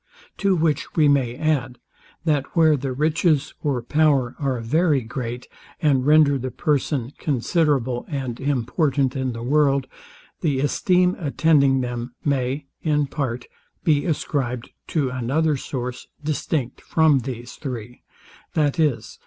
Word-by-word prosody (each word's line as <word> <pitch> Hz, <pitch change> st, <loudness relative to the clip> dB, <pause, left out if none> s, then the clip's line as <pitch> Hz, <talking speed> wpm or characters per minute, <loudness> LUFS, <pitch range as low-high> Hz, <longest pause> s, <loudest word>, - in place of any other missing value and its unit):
To 200 Hz, -2 st, +2 dB
which 160 Hz, -4 st, 0 dB
we 155 Hz, -3 st, +5 dB
may 135 Hz, -4 st, +2 dB
add, 130 Hz, -5 st, -1 dB, 0.5 s
that 150 Hz, -2 st, 0 dB
where 160 Hz, -2 st, +5 dB
the 135 Hz, -1 st, -3 dB
riches 155 Hz, +1 st, +1 dB
or 135 Hz, -6 st, -1 dB
power 140 Hz, -3 st, +2 dB
are 135 Hz, -4 st, -1 dB
very 150 Hz, +5 st, +2 dB
great, 120 Hz, +1 st, -5 dB, 0.3 s
and 140 Hz, -3 st, +2 dB
render 150 Hz, -2 st, +5 dB
the 130 Hz, +1 st, -3 dB
person 140 Hz, -3 st, -1 dB
considerable 135 Hz, -3 st, 0 dB
and 130 Hz, -6 st, -4 dB
important 135 Hz, 0 st, 0 dB
in 130 Hz, -2 st, -1 dB
the 115 Hz, 0 st, -6 dB
world, 140 Hz, 0 st, +2 dB, 0.5 s
the 145 Hz, -6 st, 0 dB
esteem 180 Hz, +5 st, +2 dB
attending 140 Hz, -4 st, +3 dB
them, 120 Hz, 0 st, -4 dB
may, 140 Hz, 0 st, 0 dB, 0.2 s
in 150 Hz, -2 st, +1 dB
part, 130 Hz, -4 st, -3 dB, 0.4 s
be 150 Hz, -3 st, +2 dB
ascribed 125 Hz, -6 st, -2 dB, 0.2 s
to 140 Hz, -6 st, 0 dB
another 140 Hz, +5 st, +1 dB
source, 125 Hz, -2 st, -5 dB, 0.2 s
distinct 150 Hz, -3 st, -2 dB
from 160 Hz, -4 st, +3 dB
these 120 Hz, -1 st, -6 dB
three, 125 Hz, -4 st, -7 dB, 0.5 s
viz. 145 Hz, -6 st, 0 dB
140 Hz, 130 wpm, -23 LUFS, 125-155 Hz, 0.5 s, we